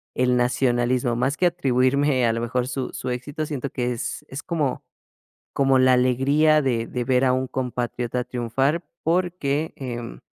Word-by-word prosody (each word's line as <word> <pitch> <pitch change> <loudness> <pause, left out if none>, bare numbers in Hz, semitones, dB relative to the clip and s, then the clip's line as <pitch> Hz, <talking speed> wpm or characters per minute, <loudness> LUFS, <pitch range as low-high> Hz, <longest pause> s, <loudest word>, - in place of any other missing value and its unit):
el 125 0 +2
nacionalismo, 120 -1 +1
más 135 +4 0
que 180 - +1
atribuirme 135 -4 +2
a 115 - +3
lo 115 - -2
mejor 125 +1 -1
su 135 -1 -3
su - - -4
éxito. 145 +5 -4
Siento 140 -3 -4
que 125 -1 -2
es 120 0 -4
es 135 +2 -6
como 150 -7 -2 0.7
como 135 -1 +3
la 130 0 +5
alegría 140 +5 +3
de 115 -4 0
de 125 -1 -3
ver 125 +1 +2
a 130 - +4
un 130 +1 -1
compatriota 125 -1 -3
triunfar, 130 +6 -1 0.2
porque, 165 -3 0
em, 120 - -6
130 Hz, 165 wpm, -23 LUFS, 125-140 Hz, 0.7 s, la